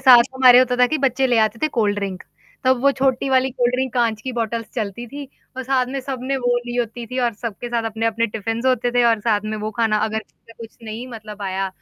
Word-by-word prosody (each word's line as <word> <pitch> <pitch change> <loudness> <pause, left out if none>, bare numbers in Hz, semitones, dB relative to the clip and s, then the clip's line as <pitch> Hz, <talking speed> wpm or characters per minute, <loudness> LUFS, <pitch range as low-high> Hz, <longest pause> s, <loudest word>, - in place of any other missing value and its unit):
साथ 255 -3 +8
हमारे 255 -2 +7
होता 250 -1 +3
था 250 0 +5
कि 310 +5 -1
बच्चे 265 -1 +1
ले 245 -2 +2
आते 220 +1 +1
थे 310 - +3
कोल्ड 205 -2 +2
ड्रिंक। 195 -2 -4 0.4
तब 260 -1 +4
वो 280 - +5
छोटी 265 0 +1
वाली 260 0 +3
कोल्ड 245 -1 0
ड्रिंक 260 0 -1
काँच 230 -3 +1
की 260 - -4
बॉटल्स 230 -1 -2
चलती 220 +1 -4
थी 285 +4 -8 0.3
और 260 - -3
साथ 255 -1 +1
में 270 +1 -3
सबने 265 0 -3
वो 245 -2 +1
ली 240 0 -4
होती 235 0 -3
थी 255 +2 -5
और 240 -1 +1
सबके 230 +2 -6
साथ 235 -1 -1
अपने-अपने 225 +1 0
टिफिन्स 225 +3 -3
होते 250 -1 +2
थे 245 - +3
और 230 -2 +3
साथ 210 -1 +1
में 215 0 -3
वो 215 +1 -3
खाना 220 0 +1
अगर 220 0 -2
किसी - - -15
का - - -31
कुछ 230 -1 -11
नहीं 225 +2 -6
मतलब 215 -3 -9
आया, 195 0 -2
240 Hz, 250 wpm, -21 LUFS, 220-255 Hz, 0.4 s, साथ